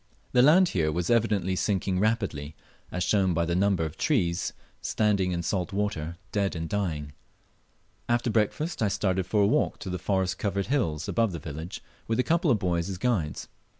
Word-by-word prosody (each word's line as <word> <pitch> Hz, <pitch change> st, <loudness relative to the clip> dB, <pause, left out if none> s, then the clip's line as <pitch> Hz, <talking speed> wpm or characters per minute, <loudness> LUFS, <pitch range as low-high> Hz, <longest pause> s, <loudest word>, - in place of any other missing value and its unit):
The 125 Hz, -, +5 dB
land 170 Hz, +7 st, +6 dB
here 80 Hz, -4 st, +1 dB
was 85 Hz, +5 st, -1 dB
evidently 105 Hz, -6 st, +2 dB
sinking 95 Hz, -1 st, 0 dB
rapidly, 100 Hz, -9 st, -1 dB, 0.4 s
as 90 Hz, -, -1 dB
shown 95 Hz, -4 st, +2 dB
by 85 Hz, +1 st, +1 dB
the 85 Hz, +1 st, -1 dB
number 95 Hz, -3 st, +2 dB
of 80 Hz, -, -7 dB
trees 90 Hz, -, +1 dB, 0.3 s
standing 100 Hz, -4 st, +1 dB
in 85 Hz, -1 st, -2 dB
salt 90 Hz, +2 st, -1 dB
water 85 Hz, -5 st, -2 dB
dead 100 Hz, -2 st, 0 dB
and 80 Hz, 0 st, -3 dB
dying. 80 Hz, -8 st, -2 dB, 1.0 s
After 120 Hz, 0 st, +1 dB
breakfast 115 Hz, +10 st, 0 dB
I 110 Hz, -, +3 dB
started 95 Hz, -2 st, 0 dB
for 105 Hz, +1 st, +3 dB
a -, -, +4 dB
walk -, -, +1 dB
to 95 Hz, -, -5 dB
the 90 Hz, -, -3 dB
forest 95 Hz, 0 st, 0 dB
covered 100 Hz, -1 st, -1 dB
hill 120 Hz, -, 0 dB
above 115 Hz, -5 st, +1 dB
the -, -, -3 dB
village, 80 Hz, +3 st, -7 dB, 0.2 s
with 115 Hz, +1 st, 0 dB
a -, -, +4 dB
couple 170 Hz, +2 st, +2 dB
of 120 Hz, -, +4 dB
boys 90 Hz, -3 st, -1 dB
as 95 Hz, -, -4 dB
guides. 90 Hz, -9 st, -1 dB
95 Hz, 185 wpm, -27 LUFS, 85-110 Hz, 1.0 s, land